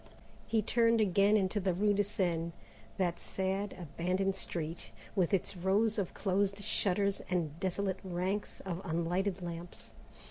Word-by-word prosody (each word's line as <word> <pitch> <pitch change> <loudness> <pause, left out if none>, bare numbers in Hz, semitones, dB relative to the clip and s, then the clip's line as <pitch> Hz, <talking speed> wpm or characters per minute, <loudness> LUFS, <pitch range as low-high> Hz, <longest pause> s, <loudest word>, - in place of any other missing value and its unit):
He 220 -2 +2
turned 230 +1 +3
again 200 +1 +4
into 195 +1 +1
the 185 -2 +1
rue 205 +2 +3
de 205 0 +3
Seine, 170 -4 -1 0.4
that 175 -3 0
sad 195 +1 -2
abandoned 180 +4 0
street, 165 -8 -4 0.3
with 185 -4 +2
its 195 0 +1
rows 205 +5 +2
of 190 - -3
closed 200 +1 0
shutters 200 -1 +1
and 165 -4 -1
desolate 190 0 -1
ranks 190 +3 -2
of 180 -2 -4
unlighted 180 +2 -1
lamps. 170 0 -7
190 Hz, 140 wpm, -33 LUFS, 175-200 Hz, 0.4 s, again